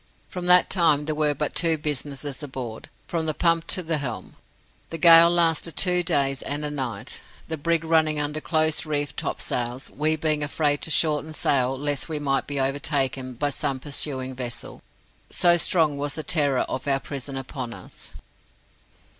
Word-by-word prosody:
From 180 -1 -5
that 180 0 +7
time 155 -5 +2
there 155 - -1
were 150 -1 0
but 150 +1 -2
two 165 -2 +2
businesses 145 -1 -3
aboard 130 -6 -7 0.2
from 165 -2 -3
the 155 - -1
pump 165 -1 +1
to 185 - 0
the 160 -2 -1
helm. 125 -5 -6 0.5
The 165 - -5
gale 165 +1 +8
lasted 165 -1 +1
two 180 -1 +4
days 140 -6 0
and 145 +1 -2
a 150 - -3
night, 125 -8 -5 0.3
the 160 - -3
brig 165 +2 -1
running 160 -2 +2
under 150 +1 -3
close 155 -1 +1
reefed 145 -2 -2
topsails, 125 +2 -3
we 155 +2 0
being 155 -1 -1
afraid 145 0 0
to - - -4
shorten 155 -1 +1
sail 130 -2 +1
lest 145 +2 -2
we 155 - -3
might 135 -2 -1
be 145 -1 -3
overtaken 135 -1 -1
by 145 +4 -1
some 140 -2 -3
pursuing 130 -2 -2
vessel, 120 -2 -6 0.5
so 175 -1 +4
strong 160 -4 +2
was 145 0 -2
the 155 - -5
terror 145 -4 +1
of 130 +2 -4
our 135 -1 +2
prison 140 0 -6
upon 130 -2 -6
us. - - -10
150 Hz, 170 wpm, -24 LUFS, 135-160 Hz, 0.5 s, gale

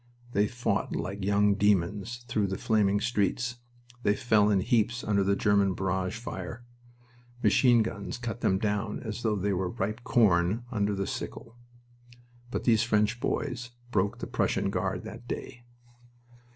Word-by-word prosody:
They 105 -2 +2
fought 120 +3 -1
like 100 +1 -4
young 100 +1 +3
demons 105 +4 0
through 105 -4 0
the 95 0 -3
flaming 105 -2 +2
streets. 120 +2 0 0.4
They 105 -3 +2
fell 110 -3 +3
in 100 -2 +3
heaps 120 +3 +1
under 100 -2 +2
the 100 +1 +2
German 100 -2 +2
barrage 95 +2 -1
fire. 115 0 -7 0.8
Machine 120 +2 +5
guns 115 - -5
cut 120 -2 -5
them 95 - +2
down 105 +1 -1
as 110 0 -5
though 110 -3 +1
they 100 0 0
were 90 -1 -1
ripe 110 +2 -3
corn 105 0 +3
under 105 -3 0
the 100 0 -2
sickle. 115 +4 -6 0.9
But - - -3
these 115 -3 +4
French 110 0 +1
boys 125 -2 -2 0.2
broke 100 +2 +1
the - - -5
Prussian - - 0
Guard - - -2
that 120 - -9
day. 120 -1 -6
105 Hz, 150 wpm, -28 LUFS, 100-120 Hz, 0.9 s, Machine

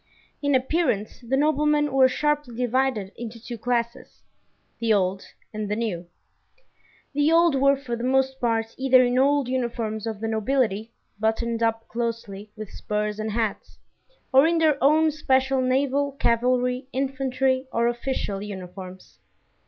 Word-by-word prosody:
In 285 -2 +2
appearance 260 - 0
the 250 +3 -1
noblemen 300 0 +2
were 265 -1 +6
sharply 295 -2 -1
divided 250 -5 0
into 230 0 -7
two 240 +1 -7
classes: 235 +1 -3 0.6
the 230 -1 0
old 190 -2 +1 0.3
and 210 -1 -4
the 210 - 0
new. 200 -7 -3 1.1
The 290 +2 +2
old 335 -1 +5
were 275 +1 +3
for 250 -3 -4
the 235 - -6
most 265 +1 +1
part 225 -2 0
either 260 -1 +5
in 245 +1 +1
old 280 0 +3
uniforms 235 -4 -2
of 220 -2 -4
the 225 - -3
nobility, 220 -1 0 0.3
buttoned 225 +1 -1
up 225 0 0
closely, 230 -3 -4
with 215 -2 -8
spurs 210 0 -3
and 215 0 -2
hats, 220 -2 -3 0.6
or 270 +4 +7
in 335 0 +2
their 310 -4 +2
own 310 +3 +4
special 265 -3 +1
naval, 275 +2 +1
cavalry, 250 +1 +1
infantry, 265 0 -1
or 235 0 +1
official 240 -4 -2
uniforms. 185 -2 -9
245 Hz, 145 wpm, -24 LUFS, 220-270 Hz, 1.1 s, or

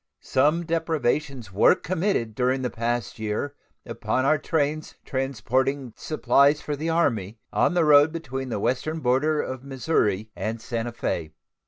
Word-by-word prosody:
Some 150 +6 +2
depredations 150 - -1
were 105 - +5
committed 180 - -1
during 130 +2 0
the 125 - -1
past 120 0 -2
year 110 +6 -2 0.3
upon 130 - -1
our 155 +2 +3
trains 155 0 -1
transporting 130 0 -1
supplies 145 -1 +3
for 150 - -3
the 155 +3 -3
Army, 115 - 0 0.2
on - - +2
the 170 -2 +3
road 145 +1 +6
between 135 -5 -5
the 110 - -2
western 155 +9 -1
border 150 +4 +2
of 130 -1 -6
Missouri 120 -7 0
and 110 +1 -3
Santa 115 +1 -3
Fe. 80 -9 -3
135 Hz, 145 wpm, -25 LUFS, 120-155 Hz, 0.3 s, road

